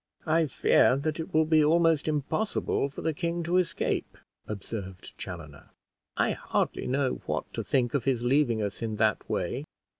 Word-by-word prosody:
"I 160 0 +3
fear 130 -1 +4
that 155 +3 -2
it 160 - -5
will 160 0 +4
be 155 -1 +4
almost 165 -1 +3
impossible 150 +1 0
for 140 - -8
the 160 - +1
king 170 +2 -2
to 175 +2 +1
escape," 180 -2 -1 0.3
observed 100 -3 -6
Chaloner. 80 -6 -8 0.5
"I - - +2
hardly - - -1
know 130 0 0
what - - -3
to - - -3
think 125 -3 +1
of 140 - 0
his 125 -3 +1
leaving 120 -4 +2
us 100 +2 -4
in 110 -2 -2
that 110 -1 +1
way." - - -1
140 Hz, 170 wpm, -28 LUFS, 115-160 Hz, 0.5 s, fear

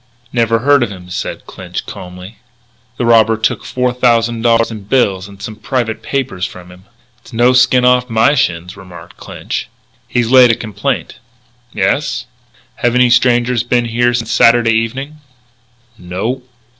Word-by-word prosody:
"Never 115 -2 +2
heard 140 +4 +3
of 120 - 0
him," 90 -2 -11
said - - -5
Clinch, - - -7
calmly. 90 +3 -10 0.6
"The 120 - -1
robber 115 -1 +4
took 110 - -1
four 125 -1 -1
thousand 120 -2 +1
dollars 115 0 +2
in 105 -3 -8
bills 100 -5 0
and 100 -1 -14
some 110 +2 -7
private 115 0 -3
papers 130 -10 -3
from 90 -1 -6
him." 90 +1 -17 0.3
"It's - - -18
no 120 +2 +3
skin 125 0 +4
off 125 0 +3
my 115 +5 +3
shins," 90 - -1
remarked 90 -4 -13
Clinch. - - -6 0.4
"He's 120 -1 -1
laid 130 -2 +7
a 115 - +3
complaint." 110 +5 -4 0.5
"Yes?" 130 +6 -1 0.5
"Have 120 -3 0
any 125 -1 +4
strangers 120 -1 +2
been 120 0 0
here 120 +1 +1
since 115 -1 -3
Saturday 115 -1 +4
evening?" 130 +7 -3 0.8
"No." 95 +9 -4
115 Hz, 155 wpm, -15 LUFS, 105-125 Hz, 0.8 s, laid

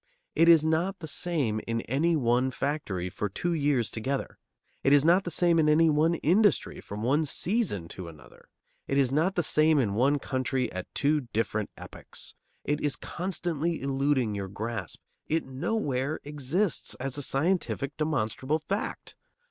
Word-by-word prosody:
It 165 +1 +5
is 160 -2 +7
not 170 +5 +1
the 165 -3 -7
same 140 -10 0
in 115 0 -1
any 155 +9 +1
one 125 -2 +2
factory 125 - -2
for 105 +3 -3
two 175 - -2
years 140 -7 +1
together. 130 +5 -3 0.4
It 135 - +4
is 145 0 +5
not 180 +4 +4
the - - -2
same 170 0 +3
in 155 0 +4
one 160 +3 +3
industry 190 +7 +2
from 105 +2 -7
one 140 +6 +2
season 165 - 0
to 90 -1 -7
another. 80 -2 -15 0.4
It 135 - 0
is 135 -2 +3
not 165 +7 +1
the 175 - +1
same 155 +1 +3
in 110 -8 +1
one 135 +7 +3
country 130 -2 -1
at 95 0 -6
two 145 -2 +1
different 110 -1 -1
epochs. - - -7 0.3
It 145 +1 -1
is 145 -2 0
constantly 170 -2 -3
eluding 135 -4 0
your 100 -1 -4
grasp. 105 -1 -5 0.3
It 160 +1 0
nowhere 135 - -2
exists, 150 +6 -1
as 135 +2 -3
a - - -3
scientific, 145 -1 0
demonstrable 145 -2 -1
fact. 200 +5 -4
145 Hz, 160 wpm, -28 LUFS, 125-165 Hz, 0.4 s, is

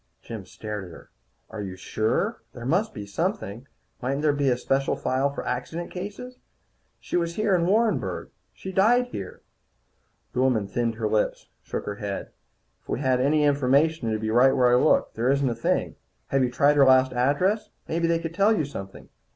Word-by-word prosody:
Jim 110 -5 -8
stared 105 -1 -6
at - - -11
her. 80 - -13 0.4
"Are 110 -1 -5
you 95 -2 -5
sure? 110 - -1
There 120 -1 -8
must 185 - +1
be 105 - -7
something. 135 - -3 0.3
Mightn't 135 +4 -1
there 150 -2 +3
be 140 -1 +1
a 125 - +2
special 135 +2 0
file 130 +2 0
for 140 - -6
accident 160 +7 -4
cases? 205 +7 -7 0.6
She - - -5
was 170 -1 0
here 215 -2 +1
in 170 -2 +2
Warrenburg. 220 +3 0 0.2
She 190 - -8
died 240 +6 +3
here." 95 - -7 0.9
The 125 - -2
woman 125 -6 +2
thinned 115 +1 -1
her 110 -1 -1
lips, 105 0 -1
shook - - -5
her 105 - -4
head. 100 -1 -5 0.5
"If - - -32
we - - -1
had 130 -2 +2
any 150 +3 +3
information, 145 -1 +2
it'd 110 -1 -1
be 110 0 -1
right 130 +3 +5
where 125 -1 +4
I - - +6
looked. 125 - +3
There 120 +3 0
isn't 140 0 +2
a 120 - 0
thing. 115 - -1 0.3
Have 135 - +2
you 125 - +2
tried 140 +4 +3
her 140 - +7
last 130 0 +5
address? 145 - +1 0.2
Maybe 165 +1 0
they 165 0 +2
could 165 0 -5
tell 205 +4 +3
you 155 - 0
something. 95 -8 -9
135 Hz, 195 wpm, -25 LUFS, 115-170 Hz, 0.9 s, her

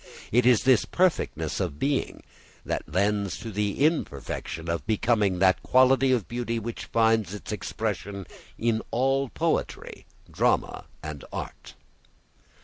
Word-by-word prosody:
It 125 +2 +4
is 125 -3 +5
this 130 -3 +5
perfectness 160 - 0
of 85 -7 -2
being 140 - -1 0.4
that - - -3
lends 100 -1 0
to 115 - -7
the 105 +6 0
imperfection 85 - -2
of 85 +2 -2
becoming 105 -3 +2
that 95 0 +3
quality 130 +1 +4
of 120 -7 +1
beauty 120 -1 -2
which 115 +1 -5
finds 110 -4 +2
its 105 - -7
expression 100 -2 -4 0.3
in 115 -1 +1
all 135 +2 +1
poetry, - - -2 0.2
drama - - 0 0.2
and 75 -2 -6
art. - - -7
110 Hz, 130 wpm, -26 LUFS, 95-125 Hz, 0.4 s, is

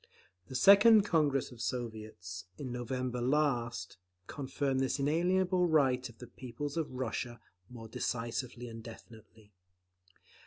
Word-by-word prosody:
The 130 - -8
second 200 - +8
Congress 150 -9 +1
of 120 -2 -10
Soviets, 110 -7 -5
in 130 -3 -5
November 125 0 -3
last, 120 -7 0 0.3
confirmed 135 0 -2
this 135 +1 0
inalienable 180 +5 +2
right 130 -6 +2
of 115 - -16
the 125 - -9
peoples 130 +4 -6
of 165 -2 -1
Russia 120 -2 -4 0.3
more 115 -2 -9
decisively 120 +2 -3
and 115 -1 -8
definitely. 110 -2 -14
125 Hz, 120 wpm, -32 LUFS, 115-145 Hz, 0.3 s, second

